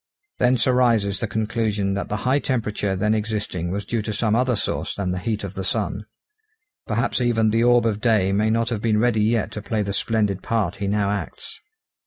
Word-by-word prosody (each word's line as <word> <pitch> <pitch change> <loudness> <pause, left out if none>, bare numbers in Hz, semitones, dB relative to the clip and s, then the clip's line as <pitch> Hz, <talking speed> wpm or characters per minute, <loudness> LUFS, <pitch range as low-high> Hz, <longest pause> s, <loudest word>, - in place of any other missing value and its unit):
Thence 125 -2 +3
arises 115 -6 +2
the 115 - -2
conclusion 105 -2 -1
that 100 - -3
the 105 - -1
high 130 +3 +3
temperature 105 -7 -1
then 105 +3 +1
existing 105 -5 -2
was 100 +3 -3
due 115 -2 -1
to 110 - -4
some 105 0 0
other 125 0 +2
source 105 - -2
than 95 -3 -2
the 90 - -2
heat 105 +1 -2
of 100 -2 -5
the 95 -1 -4
sun. 95 - -2 0.8
Perhaps 120 +3 0
even 115 -3 +2
the 115 +1 +2
orb 120 -1 +4
of 105 -2 0
day 110 -5 +3
may 105 +2 +2
not 115 +1 +1
have 115 -4 -2
been 110 -2 +2
ready 115 -2 +2
yet 110 +1 +1
to 105 - -6
play 110 0 -1
the 100 0 -3
splendid 105 -3 0
part 100 -5 -1
he 100 0 -3
now 100 0 +1
acts. 105 - -5
110 Hz, 210 wpm, -23 LUFS, 100-115 Hz, 0.8 s, orb